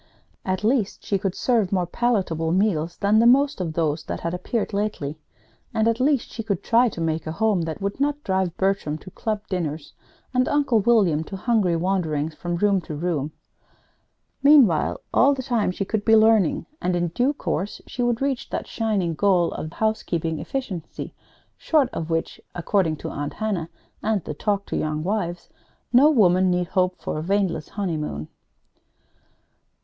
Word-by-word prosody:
At 185 +1 -2
least 220 -2 0
she 200 - 0
could 190 -1 -2
serve 225 -7 +1
more 185 -3 +1
palatable 180 -6 0
meals 175 -3 +1
than 210 +2 +3
the 230 - +5
most 275 -1 +4
of 165 -3 -3
those 155 -1 0
that - - -5
had 170 0 -2
appeared 205 +5 -2
lately; 200 -8 -2 0.6
and 220 0 +2
at 230 +1 +1
least 275 -1 +1
she 230 - -5
could 205 -5 -2
try 240 +1 +4
to 180 - -9
make 160 -1 -1
a - - -2
home 210 -1 +1
that 160 +4 -5
would 200 +5 -2
not 290 +1 0
drive 190 -3 -1
Bertram 190 -6 0
to 185 - -13
club 215 +1 -3
dinners, 155 -5 -4 0.4
and 255 0 +2
Uncle 280 -6 +2
William 195 -8 +3
to 195 - -7
hungry 200 -5 +1
wanderings 165 -4 -1
from 175 +2 -4
room 195 +1 +2
to 155 - -7
room. 155 -2 -2 1.1
Meanwhile, 270 - +5
all 280 +2 +5
the 260 - -5
time, 235 -6 0
she 190 +2 -3
could 210 +1 -2
be 225 +1 +5
learning, 220 -5 +4 0.2
and 180 0 0
in 175 -1 0
due 245 - +1
course 205 -7 -3
she 245 - -5
would 240 +1 +1
reach 275 -3 -2
that - - -3
shining 205 -7 -1
goal 180 0 +2
of 155 - -5
Housekeeping 170 -7 -1
Efficiency, 205 - -5 0.5
short 290 -6 +2
of 165 0 -4
which 165 0 -2
according 175 -2 +1
to - - -6
Aunt 145 0 -4
Hannah 195 -7 -2 0.3
and 215 -5 0
the - - -5
"Talk 200 +5 -1
to - - -4
Young 155 0 -1
Wives" 175 -3 -2 0.5
no 270 +5 +7
woman 185 - +4
need 180 0 0
hope 185 -1 +1
for - - -4
a - - -3
waneless 180 -3 -1
honeymoon. 155 - -3
190 Hz, 175 wpm, -23 LUFS, 165-225 Hz, 1.1 s, no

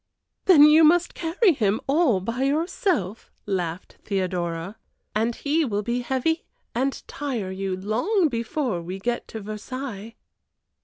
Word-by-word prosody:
"Then 335 -6 +8
you 305 +2 +7
must 345 +2 +4
carry 350 +4 +2
him 215 -5 +1
all 275 - +3
by 230 +6 -3
yourself," 285 - 0 0.2
laughed 180 -3 -3
Theodora. 180 -1 -2 0.4
"And 225 +3 0
he 305 +3 +1
will 210 -6 -1
be 240 +3 -1
heavy 265 +6 0 0.3
and 265 +3 -1
tire 250 -10 -4
you, 190 0 -3
long 245 - +1
before 235 - -2
we 180 +3 -6
get 240 +5 -2
to 220 - -7
Versailles." 215 +1 -6
235 Hz, 135 wpm, -24 LUFS, 195-295 Hz, 0.4 s, Then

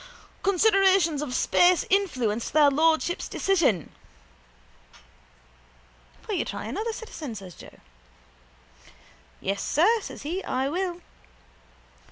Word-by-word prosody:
—Considerations 385 -5 +3
of 265 -4 -4
space 355 0 +3
influenced 255 - 0
their 295 -1 +5
lordships' 320 +4 +1
decision. 300 - 0 2.4
—Will - - -3
you - - 0
try - - -6
another, 425 - -3
citizen? 325 - -8
says 190 -3 -9
Joe. - - -15 1.6
—Yes, 195 +1 -2
sir, 425 +10 +3
says - - -9
he. 350 +6 -4
I 265 +2 -1
will. 355 +2 -3
325 Hz, 100 wpm, -25 LUFS, 260-385 Hz, 2.4 s, their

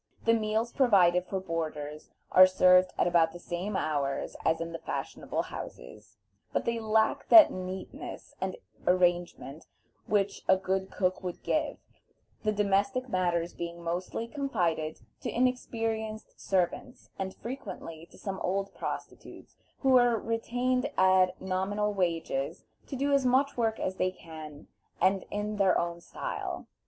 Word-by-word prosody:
The 230 - +5
meals 220 +1 0
provided 180 -8 +4
for 190 - -2
boarders 155 -4 -4 0.2
are 185 0 +9
served 185 0 +5
at - - +3
about 170 -2 +3
the - - -7
same 180 +4 -4
hours 140 -5 -1
as 160 - +2
in 165 0 -4
the 165 - -5
fashionable - - -3
houses, 105 - -10 0.3
but - - -1
they 235 0 0
lack 220 0 +1
that 330 -2 +10
neatness 185 +1 -7
and - - -2 0.3
arrangement 175 -4 +1 0.4
which 200 -1 +1
a 190 - +6
good 190 0 -1
cook 185 -1 -1
would 180 -2 -6
give, - - 0 0.6
the 215 - +1
domestic 210 +6 +1
matters 175 -3 0
being 170 0 -6
mostly 180 +7 -3
confided 175 - -1 0.2
to - - -3
inexperienced 225 -3 -1
servants, 195 +7 -1
and 190 0 -3
frequently 185 -9 -7
to - - -17
some 195 -2 -5
old 195 +2 -1
prostitutes - - -7 0.3
who 265 -2 +6
are 240 -1 +3
retained 245 +3 -1
at 185 -1 +4
nominal 200 +3 -1
wages 165 -5 -1 0.2
to 275 - -5
do 280 +2 +1
as 275 -1 +4
much 260 +3 +3
work 225 -2 0
as 190 0 -2
they 185 - +2
can, 155 -5 -10 0.3
and 190 0 +2
in 210 +1 -3
their 195 -3 +4
own 170 0 -2
style. - - -5
190 Hz, 145 wpm, -29 LUFS, 170-220 Hz, 0.6 s, that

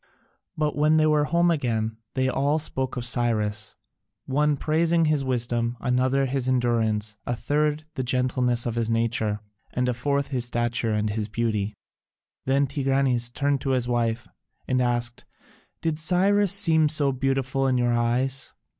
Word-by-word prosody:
But 150 -1 0
when 150 +1 +3
they 155 - +4
were 150 -1 +3
home 170 +2 +2
again, 115 -7 -1 0.2
they 130 0 +1
all 140 +3 +1
spoke 130 -4 -2
of 120 - -3
Cyrus, 110 -4 0 0.5
one 145 +2 +1
praising 165 +3 +2
his 150 -2 +1
wisdom, 120 -2 -1
another 130 +3 +1
his 130 -1 -2
endurance, 110 -4 +1
a 120 - 0
third 150 +4 0
the - - -3
gentleness 125 -1 0
of 120 - -1
his 115 -1 -1
nature, 115 -2 0 0.3
and 125 0 -1
a 125 - +1
fourth 140 +3 -1
his 125 -3 -1
stature 120 -1 -1
and 105 0 0
his 105 0 -2
beauty. 110 -2 -2 0.7
Then 135 +1 +3
Tigranes 135 -3 +1
turned 140 +1 0
to 135 - 0
his 120 -1 -1
wife 120 -1 -1 0.4
and 130 0 +1
asked, 120 -1 -1 0.6
"Did 160 -2 -1
Cyrus 190 +4 +3
seem 160 -6 +3
so 145 -2 +2
beautiful 135 0 0
in 130 -1 +2
your 120 -1 +1
eyes?" 125 +3 0
130 Hz, 155 wpm, -25 LUFS, 120-145 Hz, 0.7 s, they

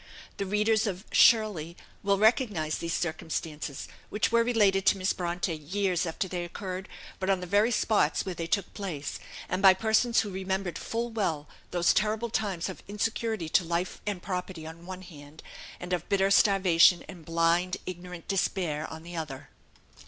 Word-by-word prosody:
The 200 - -3
readers 215 +2 +2
of 190 0 -4
"Shirley" 205 -8 +4 0.2
will 200 0 +2
recognise 210 - +2
these 170 0 -2
circumstances, 160 -3 -4 0.2
which 210 - 0
were 235 0 +4
related 205 -5 +3
to - - +5
Miss 190 +1 0
Bronte 175 -1 -2
years 180 +3 -1
after 165 +4 -2
they 180 -1 -3
occurred, 185 +2 -6 0.3
but 190 0 -2
on 195 -1 +3
the 180 - -5
very 205 +5 +3
spots 215 -3 +1
where 190 - -3
they 165 -1 -4
took 200 +2 -1
place, 175 -9 -5 0.3
and 185 +2 -2
by 190 -1 +8
persons 225 +4 +3
who 205 - -5
remembered 190 -2 -3
full 235 +1 -3
well 165 -9 -1 0.2
those 175 -1 +3
terrible 215 +2 0
times 195 -7 -1
of 190 - -7
insecurity 215 -2 -2
to 180 - +3
life 170 +2 -2
and 195 -4 -3
property 180 -3 -4
on 160 +1 -8
the 170 - -15
one 185 0 -7
hand, 150 -3 -13 0.4
and 180 +1 -4
of 175 - -2
bitter 195 0 +2
starvation 185 -4 +5
and 180 -4 -10
blind 170 +2 +1
ignorant 180 -1 -8
despair 175 -5 -1
on 160 0 -8
the 175 +1 -9
other. 150 -5 -6
185 Hz, 175 wpm, -28 LUFS, 170-205 Hz, 0.4 s, by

